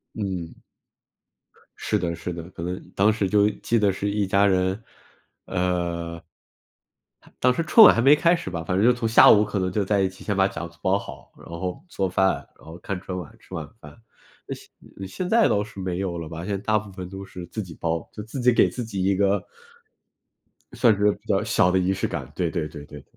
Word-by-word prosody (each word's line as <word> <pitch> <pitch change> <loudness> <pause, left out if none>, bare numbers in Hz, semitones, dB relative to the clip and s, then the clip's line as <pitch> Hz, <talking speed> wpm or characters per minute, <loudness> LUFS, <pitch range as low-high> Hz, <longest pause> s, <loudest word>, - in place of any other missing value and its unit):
嗯。 95 -6 -5 1.2
是 - - -1
的， 85 -1 -2
是 85 +1 -5
的， 85 -1 -7
可 85 - -8
能 90 +1 -3 0.2
当 105 +3 +4
时 105 -3 -1
就 105 0 +4
记 115 -1 +1
得 100 -2 +3
是 100 +2 -3
一 100 0 0
家 100 +1 +3
人， 95 +2 +1 0.6
呃 85 -2 -2 1.2
当 125 - +5
时 165 +6 -1
春 220 +7 +7
晚 - - +9
还 - - 0
没 145 +2 +7
开 170 +3 +3
始 95 - -6
吧， 85 -2 -4
反 90 +3 -1
正 105 - +3
就 125 - +6
从 115 -2 -2
下 115 - +8
午 105 0 +6
可 105 -1 -3
能 95 -1 -1
就 105 +1 0
在 100 +1 +1
一 95 - +2
起 95 - -12
先 100 -2 -2
把 95 - +4
饺 85 -3 -6
子 85 - -23
包 95 +1 +3
好， 65 -7 -11
然 - - -15
后 90 - -5
做 95 - -1
饭， 95 +1 +2 0.2
然 - - -22
后 85 +2 -9
看 90 0 -5
春 90 -1 -5
晚 85 -5 -8
吃 95 - -11
晚 80 -3 -5
饭。 - - -13 0.5
现 95 -1 -10
现 180 - -5
在 225 +2 +4
倒 105 0 +1
是 100 -2 -11
没 90 -2 -3
有 90 -3 -3
了 80 -2 -7
吧， 85 +2 -7
现 - - -6
在 - - -2
大 110 +1 +1
部 105 -2 -6
分 90 -1 -8
都 95 0 -8
是 90 -2 -9
自 110 +4 -5
己 85 -3 -11
包， 80 -1 -2
就 105 - -7
自 110 +5 -7
己 125 0 +4
给 - - +4
自 125 - -5
己 100 -4 -3
一 95 0 +2
个， 100 +1 +1 1.3
算 115 -4 +4
是 105 +1 +3
比 - - -19
较 - - +1
小 90 - +2
的 95 - +3
仪 90 +1 +1
式 95 - -1
感， 75 -4 -6
对 85 -3 -1
对 85 -4 -2
对 75 -1 -10
对。 75 -1 -12
95 Hz, 250 characters per minute, -24 LUFS, 85-105 Hz, 1.3 s, 晚